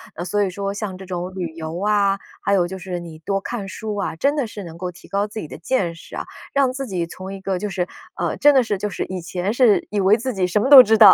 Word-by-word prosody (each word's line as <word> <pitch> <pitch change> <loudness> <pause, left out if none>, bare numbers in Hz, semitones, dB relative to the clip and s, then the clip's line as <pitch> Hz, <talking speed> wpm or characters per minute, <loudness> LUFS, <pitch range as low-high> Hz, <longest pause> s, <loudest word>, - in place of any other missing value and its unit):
呃， 175 - -4
所 205 +3 0
以 195 - 0
说 195 +2 -3
像 200 -2 -4
这 190 - -10
种 180 0 -5
旅 180 -2 -2
游 160 0 -5
啊， 200 -2 +3 0.2
还 200 - +1
有 185 -3 +4
就 190 +2 -6
是 180 -1 -5
你 165 -2 -10
多 195 +4 -1
看 205 -2 -4
书 210 +2 -5
啊， 200 - -2
真 280 - +2
的 275 -5 0
是 205 -1 -8
能 165 -2 -9
够 180 +1 -3
提 175 - -16
高 200 +1 0
自 215 +1 -6
己 - - -7
的 - - -9
见 175 0 0
识 165 - -12
啊， - - -3 0.3
让 275 -2 +3
自 270 +1 -5
己 180 -5 -2
从 185 +3 -8
一 195 - -8
个 190 -1 -1
就 210 - -3
是 185 -2 -1 0.3
呃， - - -2
真 290 0 +6
的 260 - +6
是 210 -3 -1
就 210 +2 -2
是 190 - -3
以 185 0 -5
前 180 +4 -2
是 240 -4 +4
以 205 - -1
为 195 +2 +5
自 255 +2 -3
己 190 -3 +1
什 195 +4 +1
么 260 - +1
都 280 -2 +13
知 220 -2 +4
道， 215 -1 +10
195 Hz, 315 characters per minute, -22 LUFS, 180-210 Hz, 0.3 s, 都